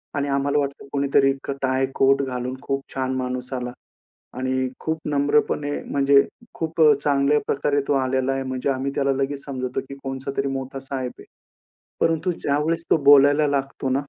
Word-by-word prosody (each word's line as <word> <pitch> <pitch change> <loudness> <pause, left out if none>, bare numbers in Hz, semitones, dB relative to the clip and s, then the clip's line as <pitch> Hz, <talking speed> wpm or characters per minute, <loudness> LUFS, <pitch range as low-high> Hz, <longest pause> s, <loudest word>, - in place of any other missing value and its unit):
आणि 145 0 0
आम्हाला 140 +1 +1
वाटतं 140 -1 -4
कुणीतरी 140 -1 +3
एक 135 +1 -3
टाय, 130 0 +1
कोट 135 +1 +4
घालून 125 0 -3
खूप 135 -1 -2
छान 130 -1 -1
माणूस 125 0 -3
आला 125 -1 -3 0.7
आणि 130 0 0
खूप 160 0 -2
नम्रपणे 145 0 +1 0.2
म्हणजे 140 0 +5 0.3
खूप 165 0 -4
अ, 150 -1 +8
चांगल्या 145 +1 +3
प्रकारे 145 0 +1
तो 145 - +2
आलेला 130 0 +1
आहे 135 0 -2
म्हणजे 130 +1 -2
आम्ही 135 +1 -1
त्याला 140 -1 +2
लगेच 140 +1 -2
समजतो, 130 -2 -3
की 140 - -7
कोणचातरी 135 +1 -3
मोठा 135 0 -4
साहेब 130 -2 -4
आहे. - - -12 0.8
परंतु 165 +2 +1
ज्यावेळेस 155 +4 0
तो - - +6
बोलायला 145 +1 +7
लागतो 135 -1 -2
ना - - +2
135 Hz, 165 wpm, -23 LUFS, 130-145 Hz, 0.8 s, अ